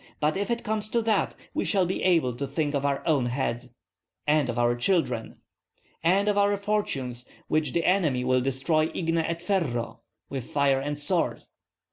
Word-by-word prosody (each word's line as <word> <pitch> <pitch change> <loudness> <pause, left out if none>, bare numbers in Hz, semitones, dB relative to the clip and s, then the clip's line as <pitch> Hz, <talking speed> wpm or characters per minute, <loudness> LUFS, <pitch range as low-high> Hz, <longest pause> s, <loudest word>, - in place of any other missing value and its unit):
But 150 +3 +1
if 200 +3 -2
it 235 0 -1
comes 215 0 -2
to 235 - +1
that, 220 -3 +1 0.2
we - - 0
shall 195 -3 +2
be 185 - -2
able 165 -10 +2
to 140 - -3
think 145 +2 -1
of 140 -1 0
our 140 -1 -1
own 145 -7 +2
heads." 125 -1 -2 0.6
"And 150 -3 +2
of 120 - -2
our 120 0 +3
children." 125 -4 0 0.7
"And 190 +5 +3
of 205 -1 +3
our 200 0 +3
fortunes, 140 - -2 0.2
which 155 0 0
the 170 - 0
enemy 160 -9 +2
will 130 0 +2
destroy 135 +5 +1
igne 165 -1 +1
et 170 +1 -3
ferro 120 - -1 0.3
(with 135 -3 -6
fire 140 -2 +2
and 145 +2 -3
sword)." 165 +4 0
150 Hz, 180 wpm, -27 LUFS, 130-185 Hz, 0.7 s, our